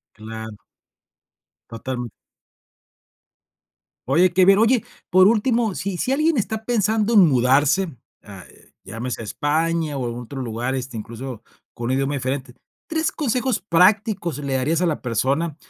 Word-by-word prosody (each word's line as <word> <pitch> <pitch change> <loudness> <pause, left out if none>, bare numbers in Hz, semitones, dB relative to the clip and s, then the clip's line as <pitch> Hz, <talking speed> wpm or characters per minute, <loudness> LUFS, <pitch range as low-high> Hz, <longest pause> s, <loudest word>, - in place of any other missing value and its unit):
Claro. 110 0 -8 1.1
Totam 120 +2 -5 2.0
Oye 170 +7 +4
qué 185 +1 +5
bien. 195 +1 +6
Oye, 230 +2 +3 0.3
por 185 +1 +6
último, 225 -1 +1
si 190 -1 -3
si 255 - -1
alguien 305 +1 +2
está 220 +1 -2
pensando 220 -1 +1
en 200 -6 +7
mudarse, 140 +6 +2 0.3
a 100 -3 -11 0.4
llámese 115 +4 -5
a - - -6
España, 155 +4 -1
o 125 -2 -2
en 115 - -6
otro 130 +3 -7
lugar, 120 +2 -3
este, 130 -3 -5
incluso, 115 +2 -7 0.3
con 120 - -6
un - - 0
idioma 135 +2 0
diferente, 130 -1 -4 0.3
3 320 0 -1
consejos 255 - -1
prácticos 185 - +2
le 140 -2 -2
darías 155 +6 0
a 180 - +2
la 155 - -2
persona 135 +7 -1
150 Hz, 140 wpm, -22 LUFS, 125-200 Hz, 2.0 s, en